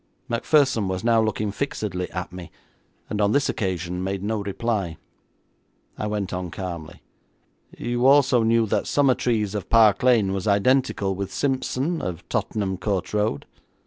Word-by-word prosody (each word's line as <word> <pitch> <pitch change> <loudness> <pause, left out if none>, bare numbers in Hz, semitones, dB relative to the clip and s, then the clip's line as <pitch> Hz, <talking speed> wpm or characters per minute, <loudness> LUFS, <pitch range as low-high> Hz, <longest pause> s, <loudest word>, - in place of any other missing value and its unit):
Macpherson 120 -2 +2
was 95 +1 -3
now 115 -1 +4
looking 105 -1 -1
fixedly 105 -8 -3
at 90 -1 -5
me, 90 -3 -8 0.6
and 105 - -2
on 100 +1 +3
this 140 - +2
occasion 90 -2 -2
made 95 0 -3
no 110 0 -1
reply. 100 -4 -2 1.0
I 105 - -3
went 105 -3 -3
on 90 -1 -3
calmly: 85 -2 -7 0.7
'You 120 +1 0
also 135 -3 +5
knew 115 0 +3
that 105 - -1
Summertrees, 120 -7 +1
of 105 -3 -5
Park 110 -3 +5
Lane, 115 -6 +3
was 95 +2 -3
identical 100 -1 +2
with 95 0 -4
Simpson, 135 - -1
of 90 -1 -5
Tottenham 95 -3 -1
Court 100 -3 -2
Road?' 105 -9 0
105 Hz, 145 wpm, -24 LUFS, 95-120 Hz, 1.0 s, also